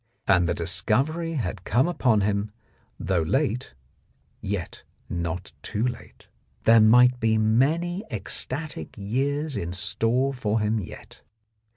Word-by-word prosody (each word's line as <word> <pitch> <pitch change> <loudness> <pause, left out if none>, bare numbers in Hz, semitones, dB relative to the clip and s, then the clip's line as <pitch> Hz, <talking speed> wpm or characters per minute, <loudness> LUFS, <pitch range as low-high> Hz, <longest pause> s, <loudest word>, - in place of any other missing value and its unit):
And 90 -3 +4
the 85 - 0
discovery 130 - 0
had 105 - -3
come 125 - +2
upon 125 -11 +2
him, 100 +1 0 0.5
though 90 -1 0
late, 125 - -1 0.7
yet 100 -3 -4 0.3
not 85 +1 -4
too 110 +3 -2
late. 120 -2 -8 0.4
There 115 0 +6
might 125 +3 +6
be 110 -1 +2
many 155 - +1
ecstatic 150 +4 -4
years 140 +8 -1
in 85 +1 -3
store 115 +8 0
for 110 -4 -1
him 110 +1 0
yet. 95 - -10
110 Hz, 120 wpm, -25 LUFS, 100-135 Hz, 0.7 s, There